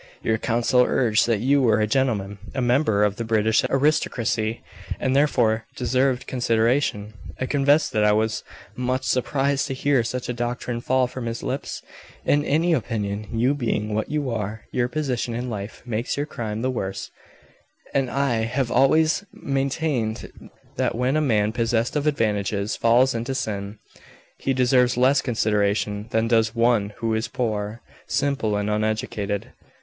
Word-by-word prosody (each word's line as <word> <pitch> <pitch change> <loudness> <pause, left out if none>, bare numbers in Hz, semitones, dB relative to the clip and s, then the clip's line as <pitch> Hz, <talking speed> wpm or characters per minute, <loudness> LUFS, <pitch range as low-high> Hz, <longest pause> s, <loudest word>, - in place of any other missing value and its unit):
Your 110 0 +1
counsel 120 +2 +2
urged 120 -4 +2
that 115 -3 +1
you 140 +3 +3
were 115 -4 +3
a 105 - +3
gentleman, 105 -5 0 0.2
a - - -1
member 120 -4 +2
of 105 -1 +1
the 115 - -2
British 110 -1 +2
aristocracy, 120 -5 0 0.4
and 130 +1 0
therefore 115 -6 +2
deserved 130 +1 +1
consideration. 115 -3 0 0.3
I 130 - 0
confess 145 +3 +3
that 105 - +1
I 105 - +5
was 110 +1 0 0.3
much 125 +2 -1
surprised 135 +2 0
to 135 - -3
hear 135 -2 +2
such 125 +2 -4
a 125 - -2
doctrine 120 0 -3
fall 130 +1 +2
from 125 -1 -6
his 115 0 -4
lips. - - -4 0.4
In 145 - +3
my 155 +4 +1
opinion, 105 -2 -3
you 120 +4 +2
being 110 -6 -2
what 110 0 -1
you 145 -4 -1
are, 110 -1 -4
your 120 -1 +1
position 125 -4 -2
in 125 +1 -3
life 100 -1 -6
makes 120 +2 -2
your 145 - 0
crime 110 -5 -5
the 130 - +1
worse, 95 -6 -4 0.8
and 135 -2 +1
I 135 -2 0
have 125 +1 -1
always 155 +6 +3
maintained 135 -4 -3 0.3
that - - 0
when 125 +4 +1
a 155 - +2
man 110 -7 +2
possessed 115 +2 0
of 150 0 0
advantages 105 -6 0
falls 120 +3 +4
into 120 +3 -3
sin, 100 -3 -4 0.6
he 135 - -1
deserves 125 -1 +3
less 135 +3 +4
consideration 105 -2 0
than 110 -1 +1
does 115 -1 +2
one 115 -3 +2
who 115 -1 0
is 110 +1 -1
poor, 110 -2 -3 0.2
simple, 140 -7 0
and 105 0 -1
uneducated. 105 -1 -2
120 Hz, 160 wpm, -23 LUFS, 110-130 Hz, 0.8 s, I